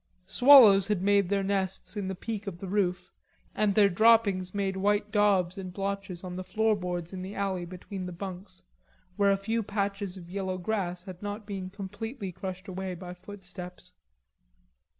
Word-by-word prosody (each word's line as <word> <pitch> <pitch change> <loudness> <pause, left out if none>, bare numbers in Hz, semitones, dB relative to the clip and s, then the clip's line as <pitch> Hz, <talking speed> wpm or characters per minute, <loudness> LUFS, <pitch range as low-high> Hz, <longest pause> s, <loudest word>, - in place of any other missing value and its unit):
Swallows 240 -8 +8
had 205 -4 0
made 200 -2 +3
their 200 -1 +1
nests 190 -1 -2
in 200 -2 -3
the 190 - -3
peak 210 +2 -5
of 185 -4 -4
the 195 - -7
roof, 185 -2 -1 0.4
and 205 -2 +1
their 205 -2 +6
droppings 200 -2 +4
made 195 -1 -1
white 205 +2 +1
dobs 195 -3 +2
and 185 -1 -6
blotches 195 -1 -4
on 180 -1 -6
the 185 - -4
floorboards 185 -5 -1
in 185 - -5
the 190 +2 -7
alley 190 -3 -2
between 185 +1 -7
the - - -5
bunks, 185 +1 -8 0.5
where 200 0 +3
a 195 - +3
few 225 +4 -1
patches 200 -2 -2
of 175 -2 -10
yellow 190 0 -3
grass 180 -2 -2
had 185 -2 -10
not 205 +1 -4
yet - - -24
been 195 -3 -5
completely 200 +2 -6
crushed 185 +2 -7
away 190 -1 -4
by 180 0 -8
footsteps. 180 -1 -10
195 Hz, 175 wpm, -29 LUFS, 185-205 Hz, 0.5 s, Swallows